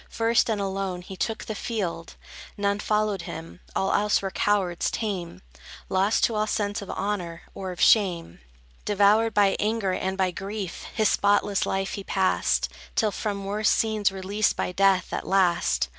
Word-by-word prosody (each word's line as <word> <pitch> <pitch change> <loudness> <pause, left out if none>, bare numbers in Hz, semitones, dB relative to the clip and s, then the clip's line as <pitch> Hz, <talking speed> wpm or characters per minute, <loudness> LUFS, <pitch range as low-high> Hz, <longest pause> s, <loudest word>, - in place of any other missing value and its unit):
First, 230 +1 +2
and 215 -2 0
alone, 195 -2 -3
he 190 - -9
took 220 +4 -3
the 215 - -4
field: 190 -7 -4 0.4
None 200 0 0
followed 210 -2 0
him; 165 +1 -8 0.2
all 195 - +1
else 210 0 +3
were 195 -1 -4
cowards 190 -5 +1
tame, 185 - -4 0.5
Lost 195 +3 +2
to 230 - +3
all 215 0 0
sense 205 0 -1
of 200 - -9
honor, 180 -5 -3
or 190 -1 -5
of 180 - -9
shame. 180 - +3 0.4
Devoured 210 +2 +3
by 200 -1 +4
anger 215 -2 0
and 190 +1 -2
by 190 -1 +1
grief, 195 +1 -5
His 215 -1 +3
spotless 200 0 +2
life 195 0 -1
he 200 - -5
passed, 190 -1 +1 0.3
Till 215 -2 +2
from 200 -1 -3
worse 210 +2 +1
scenes 215 -3 +2
released 195 +2 0
by - - -2
death, 195 0 +2
at - - -3
last. 180 -3 +2
200 Hz, 165 wpm, -25 LUFS, 190-210 Hz, 0.5 s, by